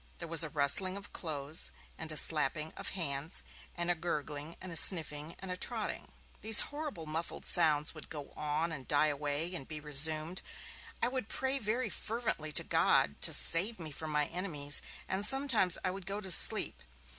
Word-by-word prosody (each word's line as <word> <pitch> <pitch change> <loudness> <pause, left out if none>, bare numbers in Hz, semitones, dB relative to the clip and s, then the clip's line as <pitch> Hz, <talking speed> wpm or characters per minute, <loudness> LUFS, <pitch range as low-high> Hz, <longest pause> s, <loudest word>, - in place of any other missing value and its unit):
There 170 - -8
was 165 0 +5
a 155 - -6
rustling 165 +6 +4
of 200 - -11
clothes, 155 -2 -1 0.3
and 160 0 -8
a 155 - -1
slapping 155 0 0
of - - -7
hands, 150 0 -2 0.3
and 175 0 -1
a - - +2
gurgling, 155 -2 -6
and 185 - -9
a - - -8
sniffing, 160 -3 +5
and 190 -1 -8
a - - -4
trotting. - - -4 0.3
These 220 -1 +8
horrible 290 - -6
muffled 160 +2 -6
sounds 155 -3 +3
would 155 - -11
go 145 -3 -9
on, 155 +3 -2
and 140 -5 -8
die 150 +1 +2
away, 145 +4 -2
and 135 -7 -6
be 155 -1 -7
resumed; 155 +4 0 0.6
I - - +3
would 255 -4 -4
pray 265 +3 -2
very 220 0 -3
fervently 220 -9 -4
to - - +4
God 70 - 0
to - - +2
save 200 +7 +4
me 160 -3 -8
from 155 +2 -8
my 150 -1 0
enemies; 150 -5 0 0.3
and 190 +2 -2
sometimes 250 -7 +3
I 185 - -2
would 190 -1 -10
go 200 +1 -4
to 190 -3 -3
sleep. - - +4
165 Hz, 185 wpm, -31 LUFS, 150-190 Hz, 0.6 s, These